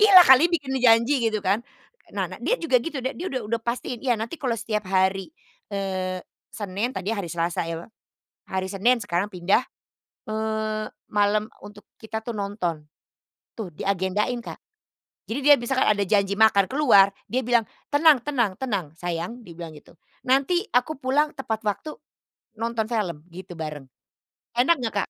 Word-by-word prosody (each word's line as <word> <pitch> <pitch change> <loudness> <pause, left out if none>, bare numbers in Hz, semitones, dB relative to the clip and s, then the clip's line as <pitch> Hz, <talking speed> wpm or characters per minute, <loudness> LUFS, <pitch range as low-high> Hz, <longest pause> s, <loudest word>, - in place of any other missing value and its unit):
"Gila 390 -4 +9
kali 265 +6 +7
bikin 285 -6 -2
janji!" 240 +3 +5
gitu 215 -2 -3
kan. 200 +4 +2 0.6
Nah - - +1
nah - - -9
dia - - +1
juga 265 - +2
gitu 270 -2 -5
deh, 260 - -1
dia 360 - -6
udah 255 -5 -3
udah 230 +2 -2
pastiin, 240 0 -3
ya 245 -4 +1
nanti 230 +9 -5
kalau 245 -4 0
setiap 215 -3 -3
hari, 190 +2 +1 0.4
eee, 185 -2 -3 0.3
Senin 205 +2 -2
tadi 195 +4 -2
ya 205 - -2
hari 175 - -5
Selasa 170 0 -2
ya 165 0 -5
wa - - -16 0.6
hari 190 0 -3
Senin 230 +6 +2
sekarang 205 0 -2
pindah, 185 +7 +2 0.7
eee, 215 0 -2 0.2
malam 210 +1 +1 0.2
untuk 210 0 -13 0.2
kita 220 0 -5
tuh 235 - -5
nonton, 180 -7 -3 0.7
tuh 190 -7 -6
diagendain 200 +7 -1
Kak. 235 - -8 0.6
Jadi 235 +5 -4
dia 290 +1 +7
misalkan 260 +2 0
ada 205 -1 +3
janji 200 0 +1
makan 210 -3 +5
keluar 255 -9 +6 0.2
dia 255 - +2
bilang, 240 -2 +4 0.2
"Tenang 295 -2 +5
tenang 235 -9 0
tenang 200 - -2
sayang," 175 +7 -4
dia 175 -8 -13
bilang 170 -2 -7
gitu, 155 +2 -16 0.3
"nanti 315 +10 +2
aku 260 +3 +1
pulang 290 +3 +1
tepat 225 -4 -4
waktu 215 +9 -3 0.6
nonton 230 0 -2
film 175 -9 -2
gitu 180 0 -9
bareng," 150 -4 -6 0.7
enak 260 +8 +4
nggak 225 -3 -3
Kak? - - -8
220 Hz, 165 wpm, -24 LUFS, 190-250 Hz, 0.7 s, Gila